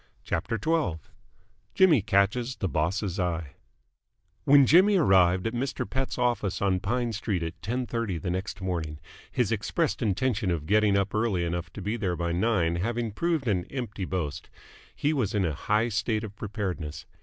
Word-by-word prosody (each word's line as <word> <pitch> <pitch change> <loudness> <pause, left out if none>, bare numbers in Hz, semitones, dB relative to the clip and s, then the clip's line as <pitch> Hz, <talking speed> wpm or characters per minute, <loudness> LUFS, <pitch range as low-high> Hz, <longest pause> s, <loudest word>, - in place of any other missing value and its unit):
CHAPTER 105 +7 -2
XII 130 - 0 0.8
JIMMY 175 - +5
CATCHES 105 +5 +1
THE 95 - -2
BOSS'S 90 +4 -1
EYE 85 -5 -2 0.9
When 140 0 +7
Jimmy 190 +8 +6
arrived 95 - +4
at 115 - -1
Mr. 125 +2 -2
Pett's 135 0 -3
office 120 -6 0
on 95 -2 +1
Pine 120 +4 -1
Street 100 -4 -2
at 80 0 -6
ten 125 +7 -2
thirty 115 -7 -2
the 85 +3 -3
next 95 +2 -4
morning 85 -5 -3 0.3
his - - 0
expressed 105 - -1
intention 110 -1 0
of 85 -4 -1
getting 105 +1 +3
up 100 0 0
early 110 -5 +1
enough 85 -1 -3
to 100 - -7
be 105 +4 -1
there 95 -5 -1
by 85 0 -2
nine 90 -3 +1
having 115 +4 -1
proved 160 - -1
an 90 -5 +1
empty 110 -7 -5
boast 80 -5 -4 0.5
he 150 +2 +1
was 115 -9 -1
in 100 -3 +2
a 80 - -1
high 105 +9 +1
state 110 0 -1
of 105 -2 -7
preparedness. 95 -8 -4
100 Hz, 170 wpm, -27 LUFS, 90-120 Hz, 0.9 s, When